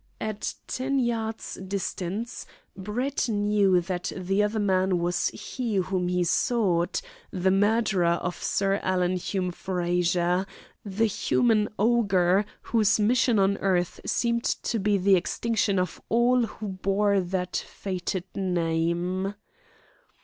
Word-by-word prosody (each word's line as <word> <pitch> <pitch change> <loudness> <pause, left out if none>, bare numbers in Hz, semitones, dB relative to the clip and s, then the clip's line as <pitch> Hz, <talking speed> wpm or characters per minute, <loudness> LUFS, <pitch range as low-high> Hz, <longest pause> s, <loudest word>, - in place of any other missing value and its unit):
At 215 -1 -3
ten 270 +2 -2
yards' 225 -3 -2
distance 195 +3 -4 0.3
Brett 240 +7 -2
knew 205 -3 +3
that 180 0 -3
the 190 +2 0
other 210 +1 0
man 190 -3 +2
was 175 +1 0
he 225 +1 -4
whom 185 -1 0
he 180 0 +1
sought, 180 -2 +1 0.3
the 185 0 +1
murderer 195 -3 +2
of 180 0 -4
Sir 195 0 +1
Alan 185 -1 +1
Hume 180 0 -2
Frazer, 180 0 0 0.4
the 205 +2 0
human 220 0 +2
ogre 200 -4 +3 0.2
whose 220 -2 +2
mission 235 +2 +3
on 195 0 +3
earth 180 -3 0
seemed 235 0 0
to 230 - -1
be 205 0 +2
the 195 +1 +4
extinction 205 +2 0
of 185 0 -2
all 240 +1 +3
who 215 -1 -7
bore 195 +1 +1
that 180 0 -3
fated 185 -1 -4
name. 175 +1 -1
195 Hz, 120 wpm, -26 LUFS, 180-215 Hz, 0.4 s, the